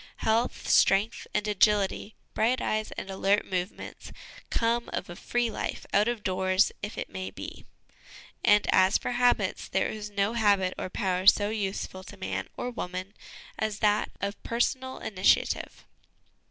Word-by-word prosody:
Health, 225 +2 0
strength, 200 +4 +3
and 210 0 -1
agility, 210 0 +2 0.2
bright 240 +4 +2
eyes 215 0 -1
and - - -6
alert 195 +2 +2
movements, 180 +1 -5 0.4
come 235 +1 0
of - - -4
a - - -7
free 240 +4 -1
life, - - -4
out 205 +2 +4
of 240 -3 -2
doors, 185 +1 +2
if 210 - -6
it - - -3
may 95 0 -5
be; - - -9 0.8
and 210 0 +5
as 190 0 +5
for - - -4
habits, 245 0 +1
there - - 0
is 210 -1 -6
no 205 +1 0
habit 200 -5 +3
or - - -5
power 185 0 -1
so 205 +1 +6
useful 195 -3 -3
to 205 - -11
man 190 - -3
or 250 - -3
woman 185 -3 -5 0.5
as 215 -1 -1
that 210 -1 +2
of 200 0 -4
personal 260 +2 -1
initiative. 190 -2 +1
205 Hz, 155 wpm, -28 LUFS, 190-220 Hz, 0.8 s, so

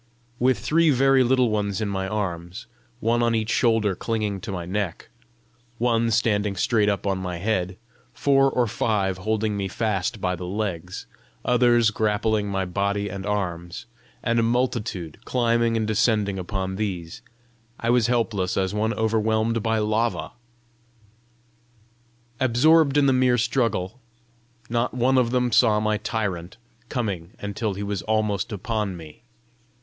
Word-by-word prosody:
With 130 0 +3
three 165 +1 +2
very 135 -1 +4
little 125 -2 +3
ones 100 -2 -1
in 110 - -1
my 95 -1 -2
arms, 95 -1 -4 0.3
one 115 +1 +1
on 115 -1 +2
each 110 0 -1
shoulder 110 -4 +2
clinging 105 -1 -2
to 105 - -6
my 90 -3 -4
neck, 95 -1 -3 0.7
one 115 -1 +1
standing 105 -2 +1
straight 105 -1 +2
up 100 -1 -2
on 95 -1 0
my 90 -2 -4
head, 95 -1 -1 0.3
four 135 -1 +3
or 125 -2 +1
five 100 -4 -1
holding 110 +1 -1
me 100 -1 -2
fast 105 +1 -2
by 90 -1 -1
the 90 0 -7
legs, 90 -3 -4 0.4
others 120 -2 +4
grappling 110 -1 0
my 95 -1 -1
body 100 +2 -1
and 95 +1 -6
arms, 90 -1 -3 0.4
and 115 0 +1
a - - +4
multitude 115 - -1
climbing 115 -2 +1
and 110 - 0
descending 105 -3 +1
upon 95 0 -3
these, 90 -6 -4 0.6
I 115 - +1
was 120 -2 +3
helpless 110 -6 0
as 95 0 0
one 110 +2 0
overwhelmed 110 +1 +1
by 110 +1 0
lava. 110 +2 0 2.1
Absorbed 140 +4 +4
in 145 - +4
the 135 - +4
merry 125 -1 +3
struggle, 115 -4 0 0.7
not 120 +2 -1
one 130 +2 +3
of 120 -2 +2
them 125 0 +1
saw 110 -2 +4
my 110 0 +1
tyrant 105 -4 -3 0.3
coming 100 -8 -3
until 105 0 -3
he 100 - -4
was 100 -2 -3
almost 110 -2 -1
upon 105 -2 -3
me. 80 +1 -12
110 Hz, 145 wpm, -24 LUFS, 95-115 Hz, 2.1 s, very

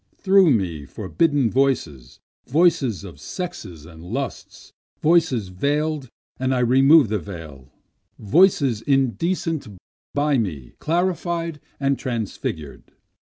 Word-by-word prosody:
Through 195 -2 +5
me 85 - 0
forbidden 140 - 0
voices, 85 - -1 0.3
Voices 150 - +2
of 85 -8 -11
sexes 100 - -7
and 80 -1 -13
lusts, 125 +8 -6 0.3
voices 150 - +2
veil'd 145 +7 -1 0.3
and 130 0 0
I - - 0
remove 135 +2 +5
the 105 -1 0
veil, 75 -9 -10 0.5
Voices 140 - +3
indecent 140 - 0 0.5
by 145 -2 +2
me 75 - -4
clarified 170 -1 -1 0.2
and 140 -1 0
transfigur'd. 105 - -5
130 Hz, 105 wpm, -22 LUFS, 95-155 Hz, 0.5 s, Through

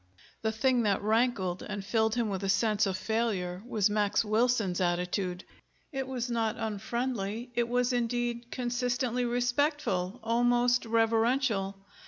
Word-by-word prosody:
The 220 - 0
thing 250 +2 +2
that 200 -3 +1
rankled 215 -5 +1
and 205 -2 -5
filled 220 +1 +1
him 235 -2 +1
with 195 -1 -3
a 195 - -1
sense 215 +1 +2
of 190 -1 -1
failure 195 -5 -1
was 215 -5 +2
Max 205 +1 +1
Wilson's 215 -4 +1
attitude. 180 +1 -1 0.5
It 270 -2 -3
was 255 -2 -3
not 230 -2 -1
unfriendly; 225 +1 -3
it 235 0 0
was, 250 +1 +1
indeed, 240 0 -1
consistently 245 0 -1
respectful, 245 - 0
almost 245 +1 +2
reverential. 225 -2 +2
230 Hz, 135 wpm, -30 LUFS, 205-245 Hz, 0.5 s, thing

